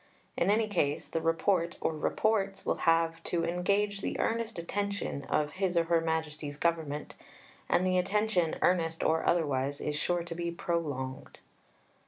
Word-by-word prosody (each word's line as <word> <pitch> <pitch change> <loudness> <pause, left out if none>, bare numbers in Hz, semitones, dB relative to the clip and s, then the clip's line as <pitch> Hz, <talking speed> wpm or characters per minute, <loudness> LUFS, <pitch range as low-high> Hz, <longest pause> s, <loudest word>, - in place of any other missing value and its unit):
In 175 - +1
any 215 +1 +3
case 150 -8 0
the 165 - -2
Report, 170 +1 +1
or 160 - -1
Reports, 195 +4 0
will - - +1
have 165 0 +2
to 170 -1 0
"engage 200 +4 0
the - - -3
earnest 230 -1 -1
attention" 200 -4 -3
of 150 +1 0
His 185 -1 -1
or 170 - +5
Her 165 0 +2
Majesty's 155 -3 -2
Government, 155 -3 -1 0.6
and 185 - +3
the 185 0 +3
attention, 195 -3 +1
earnest 165 -2 +2
or 160 +1 +2
otherwise, 145 -4 +1
is 150 - -2
sure 175 +3 0
to 170 0 -6
be 170 0 -3
prolonged. 145 -7 -3
170 Hz, 155 wpm, -30 LUFS, 160-190 Hz, 0.6 s, or